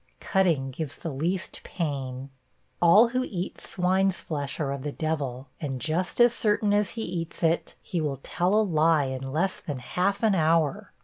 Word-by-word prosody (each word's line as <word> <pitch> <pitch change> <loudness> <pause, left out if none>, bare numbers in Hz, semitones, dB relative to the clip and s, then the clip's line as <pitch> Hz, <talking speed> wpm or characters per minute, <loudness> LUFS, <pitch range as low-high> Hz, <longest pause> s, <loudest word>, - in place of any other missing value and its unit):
(Cutting 165 -9 +1
gives 140 +1 -5
the 165 - -5
least 170 +7 -3
pain.) 135 -5 -4 0.5
'All 205 +7 +7
who 255 +1 0
eat 185 -6 -5
swine's 185 0 +1
flesh 145 -3 -4
are 140 -3 -1
of 140 -1 -4
the 145 +1 -3
devil; 140 -5 -3
and 135 -4 -3
just 165 - -1
as 240 0 +7
certain 210 -2 +2
as 205 -1 +2
he 225 - -2
eats 170 -2 -5
it, 165 +1 +1
he 175 - -2
will 145 -3 -2
tell 180 +4 0
a 220 - +5
lie 160 -4 +3
in 130 0 -4
less 175 +6 0
than 145 -4 -5
half 185 - -1
an 220 -2 +4
hour. 160 -4 +1
165 Hz, 180 wpm, -26 LUFS, 140-190 Hz, 0.5 s, All